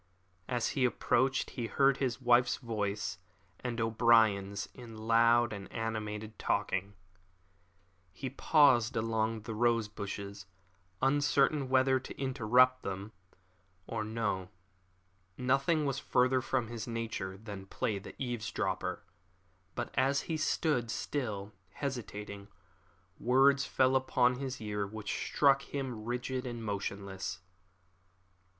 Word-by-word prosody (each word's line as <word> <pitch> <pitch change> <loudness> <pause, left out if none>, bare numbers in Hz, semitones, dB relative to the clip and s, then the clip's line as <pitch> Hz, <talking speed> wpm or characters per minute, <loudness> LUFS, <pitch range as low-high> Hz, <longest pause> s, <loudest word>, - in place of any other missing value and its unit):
As 120 -2 0
he 135 - 0
approached 130 +2 +1
he 120 -3 -3
heard 135 +1 +3
his 130 -3 -1
wife's 120 -1 +4
voice 105 -6 -3 0.4
and 120 -2 -4
O'Brien's 110 -3 +3
in 115 -3 -10
loud 115 +1 +4
and 100 -1 -8
animated 110 -1 -4
talk. - - 0 1.4
He 130 +5 -6
paused 130 -5 +4
among 110 0 0
the 110 +1 -6
rose 115 0 +2
bushes, 100 -1 -6 0.6
uncertain 145 0 +3
whether 130 0 +4
to 130 - -10
interrupt 130 -1 +3
them 100 +2 -5 0.7
or 110 +1 -3
no. 105 -4 -2 0.9
Nothing 135 +5 +2
was 140 -1 -1
further 130 0 +2
from 130 -2 -1
his 115 -1 -6
nature 115 -5 -4
than 100 -2 -8
play 100 +1 -2
the - - -11
eavesdropper; 120 -4 -2 0.7
but 120 - -3
as 135 +2 +2
he 165 - -3
stood, 150 -6 0
still 105 -6 -3 0.2
hesitating, 105 -7 -5 0.7
words 135 +3 +4
fell 130 -1 +2
upon 125 -1 +2
his 130 -1 -4
ear 105 -2 -2
which 105 0 -4
struck 140 -1 +4
him 130 -6 -5
rigid 125 +2 -3
and 120 -2 -5
motionless. 100 -3 -4
120 Hz, 115 wpm, -32 LUFS, 105-130 Hz, 1.4 s, wife's